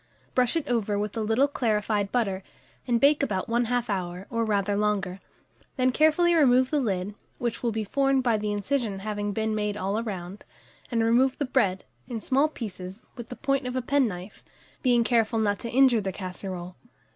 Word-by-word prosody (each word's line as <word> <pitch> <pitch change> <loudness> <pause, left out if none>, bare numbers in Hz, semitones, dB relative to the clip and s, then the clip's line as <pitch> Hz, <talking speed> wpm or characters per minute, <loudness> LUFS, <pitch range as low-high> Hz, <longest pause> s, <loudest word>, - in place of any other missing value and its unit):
Brush 250 +1 +2
it 330 - -1
over 215 -4 0
with 205 +1 -3
a 225 - -1
little 225 +6 +3
clarified 210 -6 0
butter, 200 -6 0 0.5
and 240 -1 +2
bake 285 +3 +4
about 195 -9 -1
1/2 240 +1 0
hour, 185 -2 -3
or 230 -1 0
rather 205 -2 0
longer; 200 -3 0 0.6
then 255 0 +2
carefully 315 +5 +4
remove 260 -5 +4
the 300 - +2
lid, 200 -5 -1 0.2
which 235 -2 -3
will 235 - 0
be 220 0 -2
formed 270 +4 +1
by 235 -3 +3
the 210 0 -1
incision 205 0 -1
having 205 -1 -2
been 220 +1 -1
made 210 -1 -1
all 205 +2 -1
round, 195 -3 -6 0.5
and 230 -2 +1
remove 250 +4 +3
the 285 - -1
bread, 200 -8 +1 0.2
in 240 -3 -4
small 270 +6 +2
pieces, 195 -8 -8
with 240 -3 -8
the 250 - -6
point 275 -1 -1
of 250 - -4
a 255 - 0
penknife, 220 -9 -1 0.4
being 245 -3 +3
careful 230 -1 +2
not 205 -2 +1
to 235 - -5
injure 250 -2 +4
the 195 -1 -2
casserole. 185 -1 -6
225 Hz, 185 wpm, -26 LUFS, 205-255 Hz, 0.6 s, bake